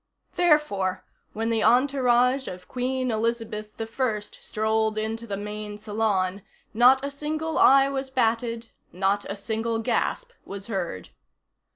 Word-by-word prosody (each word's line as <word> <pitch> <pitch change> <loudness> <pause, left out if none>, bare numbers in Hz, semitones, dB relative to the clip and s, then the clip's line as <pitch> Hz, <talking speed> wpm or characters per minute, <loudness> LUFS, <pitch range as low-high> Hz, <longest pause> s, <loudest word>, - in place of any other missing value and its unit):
Therefore, 205 - +2 0.3
when 225 +1 -1
the 225 -1 +1
entourage 255 0 +3
of 180 0 -8
Queen 255 0 -1
Elizabeth 220 -1 -2
I 225 0 -1
strolled 220 +1 -2
into 225 +2 -3
the 200 -2 -3
main 210 0 -6
salon, 205 -3 -1 0.3
not 255 +4 +5
a 280 - -3
single 310 +3 -3
eye 275 0 +7
was 270 -1 -3
batted. 230 -2 -1 0.2
Not 195 +2 0
a 200 - -3
single 225 +2 -2
gasp 480 - -1
was 200 0 -7
heard. 175 - -4
225 Hz, 130 wpm, -25 LUFS, 210-255 Hz, 0.3 s, eye